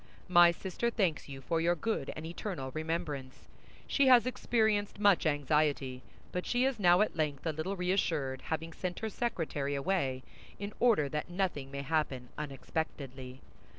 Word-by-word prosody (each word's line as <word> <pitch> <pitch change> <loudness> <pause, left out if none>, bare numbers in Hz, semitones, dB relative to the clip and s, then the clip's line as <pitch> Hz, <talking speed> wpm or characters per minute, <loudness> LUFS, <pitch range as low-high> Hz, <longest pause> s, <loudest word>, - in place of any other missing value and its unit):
My 175 -1 +7
sister 190 +6 -2
thanks 190 -11 0
you 135 -1 -7
for 165 +5 0
your 170 +1 +3
good 225 +6 -2
and 155 - -6
eternal 165 -5 -5
remembrance. 155 -4 -4 0.4
She 280 -2 +3
has 250 -2 +7
experienced 220 -5 +1
much 200 -5 +4
anxiety; 145 -3 +1 0.3
but 180 - -2
she 245 +1 +2
is 265 -4 0
now 180 -1 +5
at 215 - +1
length 150 -3 -1
a 160 - +1
little 155 +6 -3
reassured, 165 -8 0
having 160 +1 -3
sent 180 0 -4
her 220 - -1
secretary 160 -11 -2
away 140 -4 0 0.3
in 200 +1 -5
order 225 -12 +4
that 150 +4 -3
nothing 175 -7 -2
may 140 0 -5
happen 140 -5 -1
unexpectedly. 135 -3 -5
160 Hz, 155 wpm, -32 LUFS, 140-195 Hz, 0.4 s, My